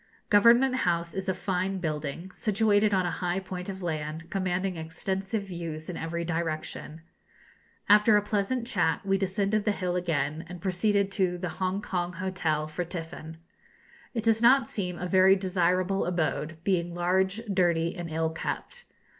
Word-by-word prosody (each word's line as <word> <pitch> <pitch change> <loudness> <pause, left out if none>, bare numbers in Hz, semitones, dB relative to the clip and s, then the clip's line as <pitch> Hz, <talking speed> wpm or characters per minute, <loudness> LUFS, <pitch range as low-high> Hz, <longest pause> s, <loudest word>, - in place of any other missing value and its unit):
Government 235 +5 +6
House 170 -6 0
is 190 0 -3
a - - +2
fine 190 +1 -1
building, 155 +1 -4
situated 210 0 +2
on 190 -2 +2
a 175 - 0
high 180 +1 -1
point 185 -1 -6
of 190 -1 -6
land, 160 0 -4
commanding 185 -1 -1
extensive 190 +6 -3
views 170 -3 -6
in - - -7
every 170 +1 -3
direction. 160 -1 -3 0.9
After 210 +1 +6
a - - +3
pleasant 215 +4 -1
chat 175 -5 0
we 195 0 +2
descended 200 +2 0
the 210 - +2
hill 180 -3 -2
again, 160 -3 -1
and 175 0 -8
proceeded 200 +2 +1
to 185 -3 +1
the 180 0 -3
Hongkong 185 -2 -1
hotel 165 -4 -1
for 155 +3 -3
tiffin. 165 -2 -7 0.8
It 225 - -1
does 225 -1 +3
not 240 0 +6
seem 180 -4 -3
a 180 - -4
very 190 +1 +5
desirable 185 0 +1
abode, 160 -2 -1
being 175 -3 0
large, 190 +4 +1
dirty, 175 -4 +1
and 175 -2 -5
ill 160 0 -1
kept. 485 - -5
185 Hz, 155 wpm, -28 LUFS, 170-195 Hz, 0.9 s, Government